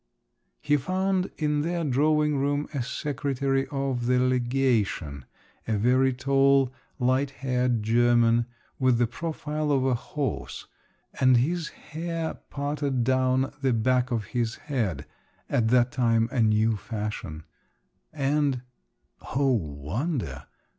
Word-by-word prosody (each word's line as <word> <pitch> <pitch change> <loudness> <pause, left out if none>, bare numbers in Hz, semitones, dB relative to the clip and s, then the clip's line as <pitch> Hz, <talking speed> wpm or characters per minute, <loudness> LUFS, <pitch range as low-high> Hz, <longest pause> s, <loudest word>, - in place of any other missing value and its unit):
He 150 -1 +2
found 185 +5 0
in 150 -1 0
their 170 +2 -1
drawing 150 +2 +2
room 145 +2 0
a 140 - -1
secretary 135 0 -1
of 135 -4 -2
the 125 0 +3
legation, 120 - 0 0.4
a 110 -2 +1
very 130 +5 +3
tall 135 0 +3 0.2
light 130 +2 +1
haired 125 -3 -1
German, 120 +1 +3 0.3
with 130 -2 +3
the 120 - +3
profile 150 +3 -3
of 135 -2 +2
a 130 - +2
horse, 120 - -4 0.5
and 130 -2 +5
his 160 +6 0
hair 165 0 -5 0.2
parted 140 -3 -1
down 130 +1 +1
the 135 -2 +2
back 125 +2 +2
of 115 -4 -1
his 120 -1 0
head 115 - -3 0.4
(at 110 - +1
that 120 +1 +3
time 115 -3 +2
a 125 - +1
new 110 0 +3
fashion), 105 -8 -5 0.7
and… 140 -3 0 0.7
oh, 135 0 +3
wonder! 105 - -3
130 Hz, 120 wpm, -26 LUFS, 120-145 Hz, 0.7 s, and